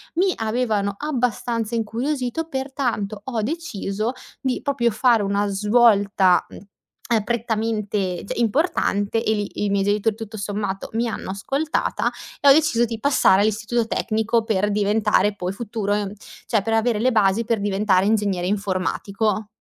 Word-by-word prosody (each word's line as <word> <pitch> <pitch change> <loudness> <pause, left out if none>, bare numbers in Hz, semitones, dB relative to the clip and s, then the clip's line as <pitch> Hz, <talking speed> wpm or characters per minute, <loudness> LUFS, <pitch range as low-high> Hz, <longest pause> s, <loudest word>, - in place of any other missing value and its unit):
mi 370 +3 +3
avevano 220 -3 -1
abbastanza 240 -5 -1
incuriosito, 250 +6 -2
pertanto 260 -7 -3
ho 240 -4 -2
deciso 220 - -3 0.3
di 260 -2 -1
proprio 260 -5 +1
fare 230 0 +3
una 200 +1 0
svolta, 200 -3 +3
mhmm, - - -11 0.5
uhm, 225 -3 +2
prettamente, 215 -5 -2
cioè - - -4
importante 225 - +1
e 220 - +1
lì 205 -1 -3
i - - 0
miei 200 -1 +2
genitori 210 +2 +1
tutto 220 -1 -8
sommato 200 -1 -3
mi 230 +2 0
hanno 210 - -5
ascoltata 275 +11 -1 0.3
e 285 - +2
ho - - +10
deciso 280 -6 +3
di 225 -1 -5
passare 240 -7 +4
all'istituto 220 +2 0
tecnico 220 0 0
per 205 -2 0
diventare 210 0 +2
poi 180 -2 -3
futuro 215 -1 -3
ehm, 205 -1 -2 0.3
cioè 220 -4 +2
per 225 - -1
avere 225 0 +2
le 255 +4 +2
basi 215 -1 +3
per 225 -1 0
diventare 195 -1 +2
ingegnere 200 -4 +1
informatico. 200 +2 -1
220 Hz, 145 wpm, -22 LUFS, 200-240 Hz, 0.5 s, ho